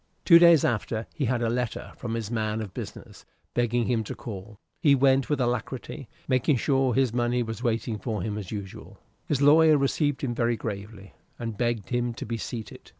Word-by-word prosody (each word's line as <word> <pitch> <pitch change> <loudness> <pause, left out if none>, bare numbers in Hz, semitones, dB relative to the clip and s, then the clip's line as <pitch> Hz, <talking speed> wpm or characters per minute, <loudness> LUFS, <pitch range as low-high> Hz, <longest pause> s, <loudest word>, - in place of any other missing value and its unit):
Two 170 -2 +9
days 170 -3 +7
after 110 0 -1
he 145 - -2
had 120 0 0
a 115 - +1
letter 125 -1 -3
from 115 -2 -4
his 115 -1 -4
man 110 -1 -1
of 105 -5 -6
business, - - -9 0.3
begging 120 0 +1
him 115 -3 0
to - - -6
call. 105 -2 -8 0.2
He 145 -5 +5
went 135 0 +3
with 150 -2 0
alacrity, 125 +2 -3 0.2
making 130 +2 +2
sure 135 0 +1
his 130 -3 +2
money 120 0 +1
was 115 0 -6
waiting 115 -2 -1
for 110 -6 -3
him 105 0 -3
as 100 -4 -6
usual. 100 -3 -8 0.3
His 145 -2 0
lawyer 155 +1 +6
received 145 +1 0
him 125 -3 -1
very 120 0 0
gravely, 100 -2 -7 0.2
and 115 -2 -5
begged 120 -1 -1
him 120 -1 -1
to - - -6
be 115 +1 -3
seated. 110 0 -7
120 Hz, 195 wpm, -26 LUFS, 110-130 Hz, 0.3 s, Two